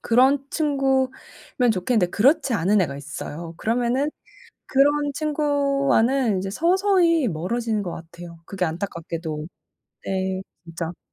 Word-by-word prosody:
그런 265 Hz, +4 st, +3 dB
친구면 265 Hz, -4 st, 0 dB
좋겠는데 190 Hz, 0 st, +1 dB
그렇지 275 Hz, -, +3 dB
않은 200 Hz, +2 st, +3 dB
애가 140 Hz, -6 st, -1 dB
있어요. 155 Hz, +3 st, -7 dB
그러면은 245 Hz, +7 st, 0 dB, 0.6 s
그런 290 Hz, +2 st, +3 dB
친구와는 275 Hz, -6 st, +1 dB
이제 195 Hz, +1 st, -3 dB
서서히 340 Hz, -, +3 dB
멀어지는 215 Hz, +5 st, -1 dB
거 175 Hz, -, -4 dB
같아요, 170 Hz, +1 st, -10 dB
그게 190 Hz, -2 st, -3 dB
안타깝게도. 165 Hz, -2 st, -4 dB, 0.6 s
네 190 Hz, 0 st, -1 dB, 0.2 s
진짜. 165 Hz, 0 st, -6 dB
230 Hz, 280 characters per minute, -23 LUFS, 175-275 Hz, 0.6 s, 그런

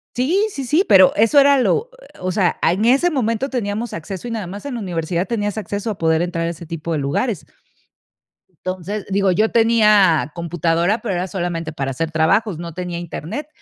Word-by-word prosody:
Sí, 350 Hz, -, +1 dB
sí, 275 Hz, -8 st, -6 dB
sí, 310 Hz, +10 st, +2 dB
pero 190 Hz, -2 st, +7 dB
eso 230 Hz, +7 st, +5 dB
era 280 Hz, 0 st, +5 dB
lo 440 Hz, -, +1 dB, 0.3 s
o 185 Hz, 0 st, -1 dB
sea, 185 Hz, -2 st, +1 dB
a 165 Hz, -, +3 dB
en 205 Hz, +5 st, 0 dB
ese 275 Hz, +8 st, +4 dB
momento 255 Hz, 0 st, -1 dB
teníamos 230 Hz, -2 st, -3 dB
acceso 190 Hz, +8 st, -6 dB
y -, -, -5 dB
nada 215 Hz, -6 st, -4 dB
más 200 Hz, +7 st, -8 dB
en 270 Hz, -4 st, -4 dB
la -, -, -4 dB
universidad 175 Hz, -1 st, -2 dB
tenías 205 Hz, -2 st, -2 dB
acceso 205 Hz, +2 st, -4 dB
a 205 Hz, -, -4 dB
poder 160 Hz, 0 st, +2 dB
entrar 170 Hz, -1 st, -2 dB
a -, -, -1 dB
ese 170 Hz, 0 st, -10 dB
tipo 165 Hz, 0 st, -4 dB
de 150 Hz, -, -1 dB
lugares. 160 Hz, -, -2 dB, 1.0 s
Entonces, 185 Hz, +3 st, -5 dB
digo, 195 Hz, -1 st, +2 dB
yo 215 Hz, +5 st, +2 dB
tenía 210 Hz, -9 st, +4 dB
computadora, 170 Hz, +4 st, 0 dB
pero 210 Hz, -5 st, -2 dB
era 180 Hz, +2 st, -2 dB
solamente 175 Hz, -3 st, -3 dB
para 135 Hz, -2 st, -3 dB
hacer 165 Hz, +5 st, -3 dB
trabajos, 170 Hz, +4 st, +1 dB
no 170 Hz, -1 st, -7 dB
tenía 180 Hz, -1 st, -5 dB
Internet. 175 Hz, -, -6 dB
190 Hz, 200 wpm, -19 LUFS, 170-230 Hz, 1.0 s, pero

